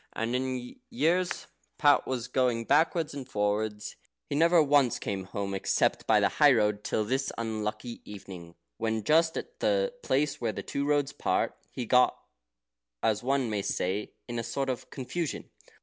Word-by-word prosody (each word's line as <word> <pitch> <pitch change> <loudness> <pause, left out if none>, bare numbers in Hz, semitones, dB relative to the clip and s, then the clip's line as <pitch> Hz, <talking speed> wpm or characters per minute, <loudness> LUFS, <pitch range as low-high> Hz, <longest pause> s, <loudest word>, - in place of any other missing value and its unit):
And 115 +2 -2
in 125 - +1
all 130 - -2
the 125 - -10
years 180 -5 0 0.3
Pat 145 -2 +4
was 125 -2 -2
going 125 -3 +1
backwards 160 +2 +2
and 135 -2 -7
forwards, 105 0 -1 0.3
he - - -6
never 165 +2 +5
once 140 -4 +3
came 95 -2 -4
home 100 +1 -4
except 95 - +1
by - - +5
the - - +4
high 145 -2 +8
road 105 -3 +1
till 110 - 0
this 135 +5 -1
unlucky 110 0 -4
evening, 90 -4 -10 0.2
when, 110 -1 -1
just 160 +5 +3
at 475 +1 -7
the - - +1
place 145 - 0
where 115 -2 0
the - - -5
two 140 0 -2
roads 145 -1 +1
part, - - 0 0.2
he 125 - -4
got, 125 +2 +4 0.9
as 110 -2 +2
one 135 0 +1
may 105 -2 -1
say, 100 +2 -2
into 120 -1 -3
a - - -2
sort 135 +3 -2
of 125 - -7
confusion. 145 +4 -4
125 Hz, 175 wpm, -29 LUFS, 105-145 Hz, 0.9 s, high